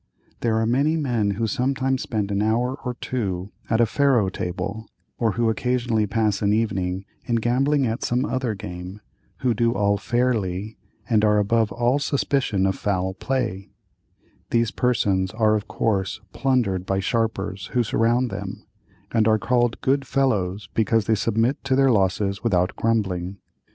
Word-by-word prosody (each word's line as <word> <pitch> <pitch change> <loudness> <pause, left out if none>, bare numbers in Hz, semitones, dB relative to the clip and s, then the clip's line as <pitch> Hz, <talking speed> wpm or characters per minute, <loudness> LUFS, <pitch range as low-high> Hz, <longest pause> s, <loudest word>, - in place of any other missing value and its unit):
There 115 -2 +1
are 110 - +1
many 140 +7 +2
men 120 -9 0
who 115 - 0
sometimes 130 +2 0
spend 105 -3 -2
an 100 0 0
hour 115 +4 +1
or 125 -1 -3
two 100 -7 -3 0.2
at 110 - +2
a 120 - +6
faro 125 -4 +2
table, 95 +5 -4 0.3
or 115 -3 +1
who 115 +4 +1
occasionally 120 -1 0
pass 105 -1 0
an 100 -1 +2
evening 95 -4 -1 0.2
in 120 - 0
gambling 130 +5 +2
at 115 0 -2
some 125 +3 +1
other 130 -5 -1
game, 90 0 -7 0.4
who 125 -2 +2
do 115 +2 +1
all 100 0 +2
fairly, 110 -5 -1 0.3
and 110 -3 +2
are 105 0 +4
above 110 +1 +2
all 120 +4 +1
suspicion 135 -8 0
of 95 - +2
foul 95 -2 -1
play; 105 -4 -2 0.8
these 115 -1 +1
persons 100 -7 +1
are 110 -1 +3
of 105 -1 -1
course 100 -4 -1
plundered 115 -7 +1
by 95 +1 -1
sharpers 105 -2 -1
who 125 - +3
surround 115 +3 +1
them, 100 0 -6 0.5
and 110 -2 +2
are 110 0 +4
called 120 +1 +1
"good 135 +1 +1
fellows" 105 -8 0
because 115 -1 +2
they 110 - +2
submit 115 +6 0
to 135 -1 +1
their 135 -1 +4
losses 100 -1 +1
without 90 -6 +1
grumbling. 100 -5 -1
110 Hz, 160 wpm, -23 LUFS, 100-125 Hz, 0.8 s, a